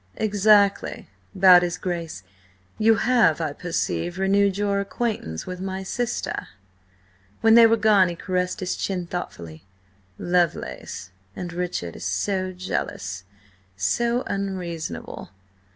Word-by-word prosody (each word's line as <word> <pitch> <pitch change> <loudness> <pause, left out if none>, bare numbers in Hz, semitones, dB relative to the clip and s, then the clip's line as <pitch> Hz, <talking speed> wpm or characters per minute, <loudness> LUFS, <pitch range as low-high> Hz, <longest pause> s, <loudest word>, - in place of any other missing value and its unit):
"Exactly," 205 -1 +2 0.2
bowed 185 -2 +8
his 175 0 -2
Grace. 170 - -4 0.6
"You 220 +1 +5
have, 220 -8 +3
I 155 -3 -2
perceive, 175 +1 -2
renewed 195 0 +2
your 200 -1 0
acquaintance 200 - -3
with 180 -1 -6
my 190 0 -4
sister." 240 +5 -3 0.9
When 225 0 +5
they 230 0 +9
were 225 0 +3
gone 210 -4 +4
he 170 - -5
caressed 180 +1 -2
his 185 - -2
chin, 185 -3 -3
thoughtfully. 85 - -7 0.5
"Lovelace... 175 - -2 0.2
and 175 -1 -6
Richard 175 - -3
is - - -9
so 185 - -1
jealous, 100 - -4 0.5
so 235 - 0
unreasonable. 185 -5 -5
185 Hz, 120 wpm, -24 LUFS, 170-200 Hz, 0.9 s, they